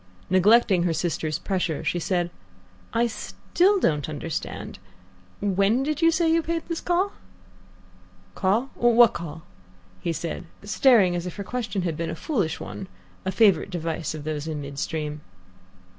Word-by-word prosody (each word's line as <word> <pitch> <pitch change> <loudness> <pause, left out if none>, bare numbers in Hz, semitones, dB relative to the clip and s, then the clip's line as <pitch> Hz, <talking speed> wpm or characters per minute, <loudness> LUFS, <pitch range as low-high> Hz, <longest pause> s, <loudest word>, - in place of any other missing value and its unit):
Neglecting 195 0 +5
her 170 -1 +1
sister's 160 -2 -1
pressure, 180 -6 -2
she 175 - 0
said, 175 0 0 0.6
"I 230 +1 +2
still 365 - +1
don't 150 - +1
understand. 155 +1 -5 0.6
When 200 +5 +2
did 300 +2 -2
you 330 - +6
say 330 0 +2
you 330 - +3
paid 330 0 -3
this 335 -1 -3
call?" 365 +3 +1 1.2
"Call? 220 - +1
What 240 -1 +5
call?" 160 -1 -7 0.7
said 170 +1 -4
he, - - -16
staring 210 -5 +5
as 175 +1 -3
if 180 - -6
her 200 - -5
question 225 -4 -3
had 170 -3 -1
been 165 0 -2
a - - -3
foolish 195 - -1
one, 190 - -7 0.4
a 190 - 0
favourite 195 -5 +4
device 165 -3 -3
of 150 - -7
those 155 0 -3
in 155 -2 -3
mid 140 -1 -6
stream. 150 -1 -3
185 Hz, 155 wpm, -25 LUFS, 160-240 Hz, 1.2 s, you